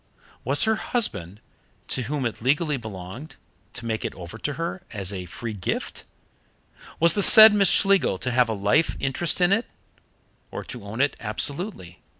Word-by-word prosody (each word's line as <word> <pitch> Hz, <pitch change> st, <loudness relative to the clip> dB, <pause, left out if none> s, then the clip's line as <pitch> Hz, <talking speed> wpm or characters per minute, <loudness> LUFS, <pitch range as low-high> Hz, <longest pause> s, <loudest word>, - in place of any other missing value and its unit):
Was 140 Hz, +4 st, +3 dB
her 220 Hz, -1 st, +1 dB
husband, 105 Hz, -, -3 dB, 0.5 s
to 130 Hz, -, 0 dB
whom 135 Hz, +2 st, -3 dB
it 115 Hz, -, -4 dB
legally 150 Hz, +5 st, 0 dB
belonged, 110 Hz, -, -9 dB, 0.4 s
to 120 Hz, -, -7 dB
make 110 Hz, -1 st, -3 dB
it -, -, -5 dB
over 90 Hz, +5 st, -10 dB
to 145 Hz, -, -3 dB
her 170 Hz, +4 st, -5 dB
as 100 Hz, -3 st, -2 dB
a 90 Hz, -2 st, -6 dB
free 110 Hz, +6 st, -7 dB
gift? 95 Hz, -3 st, -4 dB, 0.9 s
Was 170 Hz, 0 st, +5 dB
the 205 Hz, -, 0 dB
said 220 Hz, +1 st, +10 dB
Miss 200 Hz, -2 st, +3 dB
Schlegel 195 Hz, -, +2 dB
to 125 Hz, +6 st, -3 dB
have 125 Hz, -1 st, +2 dB
a -, -, -1 dB
life 105 Hz, +11 st, +1 dB
interest 140 Hz, +6 st, -1 dB
in 175 Hz, +2 st, +4 dB
it, 225 Hz, +4 st, -1 dB, 0.8 s
or -, -, -7 dB
to 120 Hz, -4 st, -9 dB
own 110 Hz, +5 st, -4 dB
it 140 Hz, -1 st, +1 dB
absolutely? 115 Hz, -, -4 dB
130 Hz, 170 wpm, -24 LUFS, 105-170 Hz, 0.9 s, said